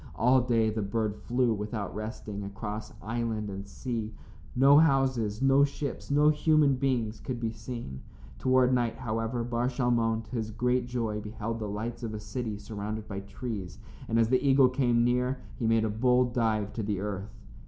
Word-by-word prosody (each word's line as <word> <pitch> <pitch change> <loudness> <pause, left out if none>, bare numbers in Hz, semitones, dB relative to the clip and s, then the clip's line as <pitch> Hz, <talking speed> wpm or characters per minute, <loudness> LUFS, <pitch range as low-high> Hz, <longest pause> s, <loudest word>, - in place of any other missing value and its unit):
All 125 +3 +4
day 115 -3 +2
the 110 0 -2
bird 105 +1 -1
flew 120 +1 +1
without 105 -1 -4
resting, 110 -1 -5
across 105 +2 -6
island 110 -1 -2
and 100 +1 -6
sea. 115 0 -4 0.4
No 140 +3 +7
houses, 130 -7 +2
no 135 +1 +5
ships, 140 -1 -3
no 145 +1 +5
human 155 -1 +4
beings 125 -5 -1
could 125 -2 -4
be 115 -1 -1
seen. 110 - -7 0.4
Toward 130 0 +3
night, 120 -2 +1
however, 115 -1 -2
Bar 120 +1 -1
Shalmon, 120 -3 +1
to 110 - -17
his 110 -3 -2
great 125 +2 0
joy, 115 -4 -2
beheld 110 +2 -4
the 105 -2 -3
lights 110 +4 -4
of 110 -2 -4
a - - -4
city 110 0 -4
surrounded 105 +1 -5
by 100 -1 -4
trees, 100 -2 -6 0.3
and 115 - +1
as 115 -1 +3
the 130 0 +3
eagle 135 -2 +5
came 125 -3 +2
near, 125 +2 +1 0.2
he 115 - 0
made 115 0 +3
a - - 0
bold 125 +2 +2
dive 110 -4 0
to 115 - -3
the 100 -2 -2
earth. 100 0 -4
115 Hz, 180 wpm, -29 LUFS, 105-125 Hz, 0.4 s, No